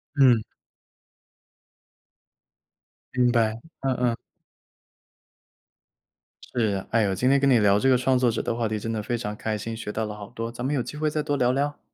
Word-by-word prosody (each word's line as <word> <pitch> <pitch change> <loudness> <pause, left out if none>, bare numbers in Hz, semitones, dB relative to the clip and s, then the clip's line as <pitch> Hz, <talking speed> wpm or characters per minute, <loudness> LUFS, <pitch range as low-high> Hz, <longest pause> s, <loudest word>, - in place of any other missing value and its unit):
嗯。 130 -5 +5 2.7
明 125 -1 +3
白， 115 -2 +1 0.2
嗯 135 -1 0
嗯。 125 -2 +1 2.4
是。 105 -5 0
哎 115 - +3
呦， 100 -2 +1
今 125 +7 +1
天 140 +1 +4
跟 140 0 +3
你 125 - +5
聊 100 -1 +4
这 135 - +2
个 130 - +5
创 130 +1 +2
作 125 -1 +3
者 115 - -2
的 115 - -2
话 115 -1 0
题 110 0 -2
真 115 +2 -4
的 110 -1 -2
非 120 +3 -2
常 105 -3 -4
开 110 0 -3
心， 115 +2 -5
学 110 -2 -5
到 110 +1 -2
了 105 -1 -6
好 100 -1 -9
多， 115 0 -5
咱 120 +1 -6
们 140 - 0
有 135 - +1
机 150 - -7
会 155 0 0
再 150 0 -1
多 145 -1 -1
聊 125 -1 +3
聊？ 145 +3 -1
120 Hz, 205 characters per minute, -25 LUFS, 110-130 Hz, 2.7 s, 嗯